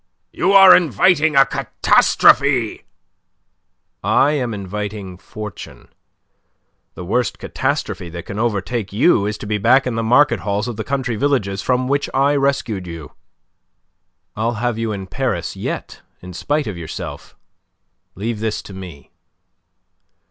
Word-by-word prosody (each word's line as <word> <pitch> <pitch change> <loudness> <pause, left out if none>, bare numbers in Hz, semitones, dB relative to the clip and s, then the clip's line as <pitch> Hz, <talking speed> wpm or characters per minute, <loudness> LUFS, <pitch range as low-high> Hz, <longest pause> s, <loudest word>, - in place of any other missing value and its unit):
"You 195 - 0
are 195 -2 +9
inviting 160 - +3
a 135 0 +7
catastrophe." 130 -4 +2 1.2
"I 145 - +3
am 130 -6 -1
inviting 100 -2 -6
fortune. 105 +1 -10 1.1
The 90 - -8
worst 120 +7 -1
catastrophe 85 - -3
that 85 0 -8
can 100 - -6
overtake 110 -1 -2
you 105 - +3
is 105 0 -3
to - - -9
be 105 0 -2
back 130 +6 +4
in 125 - -2
the 115 - -1
market 120 0 +3
halls 100 +3 -2
of 120 - -4
the 110 - -4
country 130 -4 -2
villages 105 -8 0
from 125 +2 0
which 140 +1 0
I 140 +2 +3
rescued 135 -9 -1
you. 85 -3 -8 1.2
I'll 115 +2 -1
have 120 +1 -1
you 115 -1 -2
in 95 -2 -5
Paris - - -3
yet - - -6 0.2
in 90 0 -10
spite 145 - -1
of 95 -5 -6
yourself. 80 -1 -8 0.8
Leave 110 +3 -4
this 110 -1 -3
to 100 - -11
me." 90 -6 -11
110 Hz, 140 wpm, -19 LUFS, 100-135 Hz, 1.2 s, are